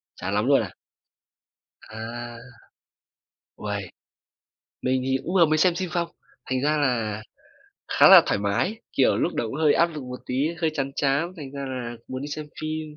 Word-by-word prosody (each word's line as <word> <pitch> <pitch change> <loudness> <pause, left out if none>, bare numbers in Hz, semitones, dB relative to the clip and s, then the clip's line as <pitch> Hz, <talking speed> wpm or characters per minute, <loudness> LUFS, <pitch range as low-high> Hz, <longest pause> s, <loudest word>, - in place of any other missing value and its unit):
Chán 95 +2 -4
lắm 105 +2 +1
luôn 140 0 +5
à? - - -6 1.1
À. 120 +2 -7 1.2
Uầy! - - -4 0.9
Mình 130 0 +1
thì 130 0 +1
cũng 180 - -3
vừa 175 -3 +6
mới 155 0 +2
xem 180 +2 +4
phim 185 0 -3
phong. 170 0 0 0.4
Thành 130 0 +1
ra 150 +2 +2
là 115 -7 0 0.7
khá - - +7
là - - +10
thoải - - +1
mái, 120 - -1
kiểu, 135 - +3
lúc 175 - 0
đầu - - -1
cũng 125 - -5
hơi 155 -2 +5
áp 170 - +4
lực 155 -4 -7
một 125 0 -7
tí, - - -3 0.3
hơi 160 -2 +2
chán 140 -2 -1
chán, 145 +5 +1
thành 145 -5 -8
ra 140 -1 -5
là 120 -2 -5
muốn 130 +1 -5
đi 145 - -5
xem 150 +1 -5
phim, 155 -1 -4
140 Hz, 185 wpm, -25 LUFS, 120-155 Hz, 1.2 s, là